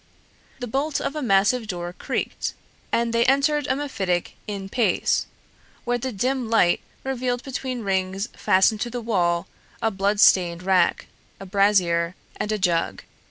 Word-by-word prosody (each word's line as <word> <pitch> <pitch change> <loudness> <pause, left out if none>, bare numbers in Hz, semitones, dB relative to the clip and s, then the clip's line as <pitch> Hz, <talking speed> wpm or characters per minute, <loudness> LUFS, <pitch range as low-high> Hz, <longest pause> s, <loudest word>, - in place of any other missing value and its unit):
The 245 - -5
bolt 275 +5 -1
of 280 - -3
a 305 - -3
massive 220 +1 +2
door 175 -3 -4
creaked, - - -3 0.4
and 235 0 +1
they 235 0 +4
entered 280 +2 +2
a 260 - +1
mephitic 200 -11 -2
in 200 -2 -5
pace, 230 +3 +1 0.6
where 245 0 0
the 260 +2 -3
dim 250 +3 -1
light 200 -6 +3 0.2
revealed 250 -2 -2
between 255 -2 -4
rings 190 +1 -1
fastened 200 +3 +3
to 240 - -1
the 245 +1 -4
wall 175 -7 0 0.3
a 225 - 0
bloodstained 190 -3 +3
rack, 190 -1 +2 0.3
a 195 - -8
brazier, 185 -3 +2 0.2
and 210 - -3
a 215 - 0
jug. 175 -4 0
215 Hz, 150 wpm, -24 LUFS, 190-250 Hz, 0.6 s, they